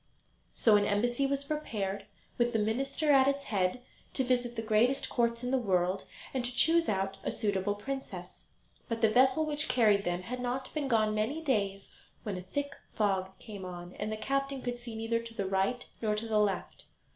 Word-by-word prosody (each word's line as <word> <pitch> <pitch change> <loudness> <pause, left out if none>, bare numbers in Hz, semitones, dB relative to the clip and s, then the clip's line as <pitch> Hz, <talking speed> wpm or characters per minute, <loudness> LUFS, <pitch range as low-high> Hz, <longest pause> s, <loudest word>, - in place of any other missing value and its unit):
So 215 -3 +5
an 205 - +2
embassy 240 +6 +1
was 280 0 0
prepared, 220 -10 -3 0.3
with 240 0 +2
the - - +3
minister 270 +8 +1
at 270 -1 +6
its 280 0 +1
head, 200 +4 0 0.3
to 265 - +3
visit 245 -1 0
the 225 - -3
greatest 225 +5 +2
courts 235 0 +1
in 245 - -1
the 265 - +3
world, 185 -3 +1 0.3
and 260 -2 -1
to 245 0 -3
choose 330 +3 +4
out 195 -1 -1
a - - -1
suitable 205 -1 0
princess. 205 -6 -6 0.4
But 230 -1 -2
the 220 -2 +5
vessel 260 +6 +4
which 300 0 +1
carried 210 -5 +4
them 175 0 -1
had 250 +7 -5
not 250 +2 -3
been 300 -3 -1
gone 215 -4 +3
many 220 +9 0
days 200 -10 -1 0.3
when 205 -3 -3
a 180 - -4
thick 280 +10 -4 0.2
fog 190 -3 0
came 205 -2 -9
on, 175 -1 -7
and 210 +1 -2
the 215 - -2
captain 275 +3 -1
could 245 -1 -2
see 240 -2 -8
neither 225 +1 0
to 230 0 -9
the 200 - -1
right 195 +6 0 0.2
nor 215 -2 +1
to 220 +2 -3
the 215 -1 +2
left. 205 -2 -1
225 Hz, 200 wpm, -31 LUFS, 205-260 Hz, 0.4 s, at